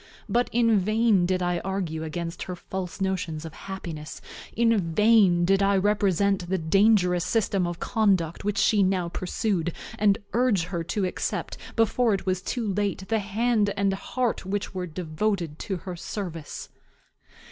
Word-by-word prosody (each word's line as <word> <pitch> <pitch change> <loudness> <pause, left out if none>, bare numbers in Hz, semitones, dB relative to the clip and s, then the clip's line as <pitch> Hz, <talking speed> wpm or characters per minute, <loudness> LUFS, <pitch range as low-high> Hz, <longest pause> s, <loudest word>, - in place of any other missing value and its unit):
But 245 +1 +1
in 230 -3 +3
vain 215 -2 +3
did 185 0 0
I 175 -1 0
argue 180 -5 -3
against 165 +2 -5
her 180 - -3
false 185 +1 -6
notions 180 -5 -2
of 160 - -8
happiness, 170 -6 -7 0.3
in 230 0 +3 0.2
vain 210 -6 +5
did 195 +2 +3
I 200 0 +3
represent 200 -2 +1
the 190 - +1
dangerous 180 +1 +3
system 195 -5 +1
of 175 -1 -5
conduct 195 -8 +1
which 205 0 -1
she 210 0 +4
now 185 -2 +1
pursued, 180 -1 -1 0.3
and 205 -2 +4 0.2
urge 235 -7 +2
her 175 -1 -3
to 200 +3 -1
accept, 180 - -3 0.2
before 225 0 +3
it 190 - -6
was 185 -1 0
too 220 -2 -2
late, 200 -1 -2
the 225 -1 +2
hand 210 +1 +1
and 195 0 +2
heart 240 +5 -2
which 195 +2 -3
were 180 -1 -3
devoted 170 0 -2
to 190 - -3
her 180 +1 -7
service. 170 -4 -6
190 Hz, 160 wpm, -26 LUFS, 175-210 Hz, 0.3 s, vain